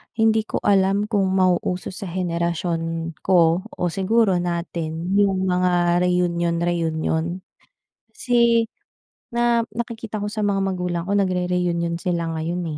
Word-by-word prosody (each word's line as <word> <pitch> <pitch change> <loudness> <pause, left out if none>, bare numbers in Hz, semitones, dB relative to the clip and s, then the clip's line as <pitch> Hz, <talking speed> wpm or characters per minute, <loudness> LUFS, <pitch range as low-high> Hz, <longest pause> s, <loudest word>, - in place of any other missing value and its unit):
hindi 220 -1 +2
ko - - -3
alam 195 0 +3
kung 210 -3 0
mauuso 185 -1 +1
sa 190 +1 -7
henerasyon 170 -1 -2
ko 170 -2 +3 0.2
o 180 - -1
siguro 195 0 +2
natin 170 -1 -3
'yong 195 -2 +2
mga 180 -1 +2
reunion-reunion, 170 -1 0 0.7
kasi, 235 - +3 0.6
na 235 -1 +2 0.2
nakikita 225 -3 -4
ko 205 - -4
sa 220 - -3
mga 200 -2 +1
magulang 180 -2 -2
ko, 200 - -3
nagre-reunion 180 -3 0
sila 170 -2 -1
ngayon, 165 +3 -3
180 Hz, 115 wpm, -22 LUFS, 170-200 Hz, 0.7 s, alam